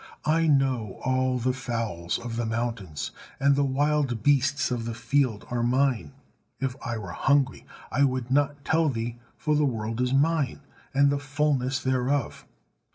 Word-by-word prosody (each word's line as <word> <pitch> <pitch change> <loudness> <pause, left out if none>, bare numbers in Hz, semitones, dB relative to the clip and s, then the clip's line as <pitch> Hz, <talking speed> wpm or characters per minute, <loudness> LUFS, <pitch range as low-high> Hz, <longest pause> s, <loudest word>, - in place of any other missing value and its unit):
I 160 +2 +3
know 130 -8 +1
all 130 0 +1
the 125 +1 0
fowls 115 -9 -2
of 120 -1 -6
the 120 0 -1
mountains: 110 - -3 0.3
and 140 0 +4
the 140 - +2
wild 140 -4 +1
beasts 145 0 +2
of 120 -2 -2
the 115 -1 -4
field 125 -4 0
are 120 -1 0
Mine. 130 +1 +1 0.5
If 135 -2 -2
I 115 0 -2
were 100 -5 -6
hungry, 135 +6 +1 0.2
I 140 - +3
would 130 -2 0
not 145 0 +1
tell 160 -1 +3
thee: 120 -1 -3 0.2
for 150 -1 +1
the 150 - +3
world 115 -3 -1
is 125 0 +1
Mine, 140 -1 +1 0.3
and 140 +1 +4
the 140 - 0
fullness 140 -2 0
thereof. 130 0 -1
130 Hz, 160 wpm, -26 LUFS, 120-140 Hz, 0.5 s, and